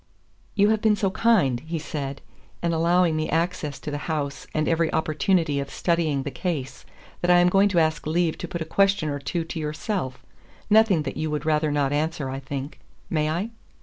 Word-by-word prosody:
"You 205 -1 +4
have 220 -1 +2
been 215 -1 +4
so 195 -2 0
kind," 185 - +3
he 160 +5 -5
said, 145 -3 -5 0.4
"in 170 -1 +1
allowing 170 0 +3
me 155 0 -1
access 160 -3 -1
to 150 - -5
the 145 - -3
house 140 -4 -3
and 155 0 0
every 165 -1 +2
opportunity 160 -1 +1
of 140 0 -4
studying 160 -6 0
the 140 - -4
case, 140 -2 -4 0.3
that 175 - 0
I 180 - +7
am 175 0 +5
going 195 +2 +4
to 180 -3 +2
ask 155 -2 +1
leave 165 0 +1
to - - -4
put 170 -3 -5
a - - -10
question 195 0 +2
or 145 0 -3
two 170 +4 -2
to 165 0 -6
yourself 150 - -3 0.5
nothing 210 -7 +5
that - - -5
you 155 +1 -1
would 150 0 -3
rather 155 0 +2
not 145 -1 +1
answer, 150 -2 -1
I 135 - -4
think. 135 +1 -6 0.3
May 155 -2 +1
I?" 175 +8 -1
160 Hz, 205 wpm, -25 LUFS, 145-180 Hz, 0.5 s, I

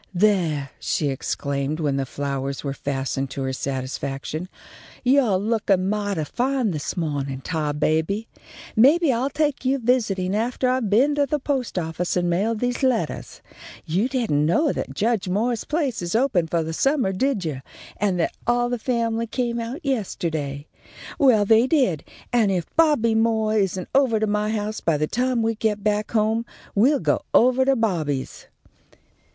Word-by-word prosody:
"There!" 175 -8 +1
she 150 - 0
exclaimed, 140 +2 -2
when 145 -4 0
the 135 -1 -2
flowers 140 0 -3
were 140 -2 -2
fastened 135 -1 -3
to 135 - -4
her 130 0 -2
satisfaction. 135 +5 -4 0.5
"Yo' 255 -6 +4
lookin' 200 -2 +1
mighty 205 -5 -1
fine 250 - 0
this 150 +1 -4
mawnin', 140 -5 -2
Tarbaby! 160 +6 -1 0.5
Maybe 285 +5 +5
I'll 250 +4 0
take 295 -2 -1
you 265 +1 +2
visitin' 215 -7 0
aftah 240 +4 0
I've 255 -5 0
been 255 +9 +4
to 285 -1 +1
the 300 - 0
post 270 -6 -2
office 170 +1 -2
and 175 0 +1
mailed 210 +5 0
these 245 0 -1
lettahs. 260 -4 -1 0.4
You 185 +9 0
didn't 230 - +1
know 270 - +2
that 135 - -5
Judge 215 +2 0
Moore's 225 +4 0
place 295 - -1
is 175 +3 -3
open 225 -9 +2
for 165 0 0
the 160 +1 -4
summah, 270 - +1
did 220 -2 0
you, 140 -4 -3 0.4
and 195 -3 0
that 165 - 0
all 240 0 +2
the 245 -1 -2
family 230 -1 -1
came 235 0 -2
out 245 +9 -6
yesta'day? 160 - -2 0.5
Well, 245 -8 +5
they 225 +4 +5
did, 255 - +1 0.3
and 225 -5 +3
if 180 -3 -1
Bobby 295 -9 +3
Moore 220 -1 +2
isn't 190 -3 0
ovah 260 -5 +3
to - - +3
my 210 0 0
house 215 0 -2
by 165 -3 +1
the 155 - +1
time 245 +5 0
we 225 0 +1
get 215 -2 -1
back 210 0 0
home, 220 +1 +1 0.3
we'll 265 +8 +4
go - - +1
ovah 255 +2 +5
to 270 0 +3
Bobby's." 160 - -2
210 Hz, 165 wpm, -23 LUFS, 160-245 Hz, 0.5 s, Maybe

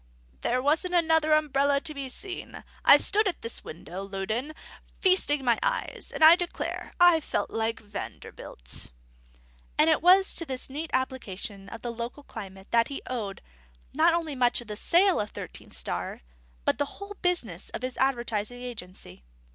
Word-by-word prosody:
"There 255 +1 0
wasn't 320 +5 +2
another 320 -2 +4
umbrella 285 -2 +2
to 315 -1 -3
be 275 -2 -5
seen. 370 +8 -7 0.2
I - - +9
stood 420 +1 +2
at 370 - -3
this 230 - -5
window, 175 +3 -8
Loudon, 200 +9 -3 0.5
feasting 300 -7 +3
my 235 -2 +3
eyes; - - -2
and - - 0
I 320 +2 +10
declare, 350 -1 -4
I 350 -2 +7
felt 305 - -2
like 225 +1 -1
Vanderbilt." 200 - -7 0.9
And 310 +2 +5
it 310 - +2
was 375 +3 +6
to 335 - +2
this 260 0 -3
neat 305 +3 -4
application 205 -6 -3
of 230 - -9
the 240 -1 -3
local 235 +5 -6
climate 195 -6 -10
that 230 0 +4
he 280 - -6
owed, 215 -6 -4 0.5
not 330 +4 +4
only 325 -3 -2
much 250 -2 +2
of 240 - -9
the 210 - -4
sale 360 - +3
of 205 - -4
Thirteen - - -9
Star, - - -3 0.4
but - - +1
the 285 0 -2
whole 400 0 -8
business 245 - -1
of - - -6
his 255 0 -3
advertising 240 -3 -1
agency. 185 - -8
265 Hz, 165 wpm, -27 LUFS, 225-325 Hz, 0.9 s, I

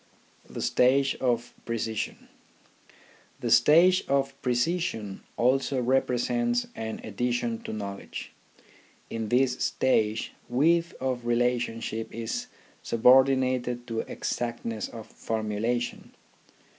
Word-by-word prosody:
THE - - -5
STAGE 135 +2 +3
OF 120 -2 0
PRECISION 115 -2 -3 1.1
The - - -2
stage 180 +4 +6
of 135 0 +1
precision 125 - -1 0.2
also 130 +2 +2
represents 135 - +1
an 110 0 -5
addi 120 +4 -2
tion 120 -2 -1
to - - -4
knowledge. 100 -2 -6 0.8
In 115 -2 -3
this 125 +1 +2
stage, 110 -4 +1 0.2
width 165 +7 +2
of 125 -2 -2
relation 120 -1 +1
ship 110 0 -4
is 115 0 -4 0.3
subordinated 130 0 +3
to 115 -1 -2
exactness 115 -2 -3
of 115 -2 -9
formulation. 110 +2 -3
120 Hz, 100 wpm, -27 LUFS, 115-130 Hz, 1.1 s, stage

